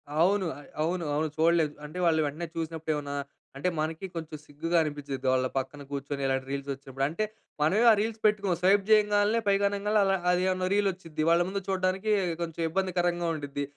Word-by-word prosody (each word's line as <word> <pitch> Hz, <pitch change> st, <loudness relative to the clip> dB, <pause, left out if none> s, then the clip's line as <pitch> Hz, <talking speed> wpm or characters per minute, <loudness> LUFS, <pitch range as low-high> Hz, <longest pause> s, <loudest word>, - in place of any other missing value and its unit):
అవును. 185 Hz, +5 st, +3 dB, 0.4 s
అవును. 170 Hz, +2 st, -1 dB
అవును 155 Hz, +1 st, 0 dB
చూడలేం. 165 Hz, -1 st, +3 dB
అంటే 150 Hz, +4 st, -9 dB
వాళ్ళు 160 Hz, -2 st, +3 dB
వెంటనే 160 Hz, +4 st, -5 dB
చూసినప్పుడు 160 Hz, -1 st, -2 dB
ఏమన్నా 145 Hz, -1 st, -4 dB, 0.4 s
అంటే, 165 Hz, +6 st, 0 dB
మనకి 160 Hz, +4 st, -2 dB
కొంచెం 160 Hz, -2 st, -5 dB
సిగ్గుగా 165 Hz, +4 st, -1 dB
అనిపించిద్ది. 145 Hz, -3 st, -4 dB
వాళ్ళ 130 Hz, 0 st, +2 dB
పక్కన 135 Hz, +2 st, -3 dB
కూర్చొని, 140 Hz, 0 st, -4 dB
ఇలాంటి 135 Hz, 0 st, 0 dB
రీల్స్ 140 Hz, 0 st, -4 dB
వచ్చినపుడు. 135 Hz, 0 st, -5 dB
అంటే, 165 Hz, +8 st, -2 dB, 0.4 s
మనమే 195 Hz, +10 st, +3 dB
ఆ -, -, +7 dB
రీల్స్ 220 Hz, +1 st, -2 dB
పెట్టుకోం. 205 Hz, -3 st, +3 dB
స్వైప్ 195 Hz, +2 st, +4 dB
చేయంగాల్నే, 210 Hz, +1 st, +4 dB
పైకి 200 Hz, 0 st, +3 dB
అనంగాల్నే, 205 Hz, +1 st, 0 dB
వాళ్ళ 195 Hz, -1 st, +3 dB, 0.2 s
ఆదేమో 185 Hz, +1 st, +1 dB
రీల్ 205 Hz, -1 st, +3 dB
వచ్చిద్ది. 165 Hz, -4 st, -5 dB
వాళ్ళ 170 Hz, +1 st, +5 dB
ముందు 195 Hz, +1 st, -3 dB
చూడడానికి, 190 Hz, +2 st, 0 dB, 0.3 s
కొంచెం 165 Hz, -1 st, -4 dB
ఇబ్బందికరంగా 175 Hz, -1 st, 0 dB
ఉంటుంది. 145 Hz, -1 st, -4 dB
170 Hz, 170 wpm, -28 LUFS, 150-195 Hz, 0.4 s, ఆ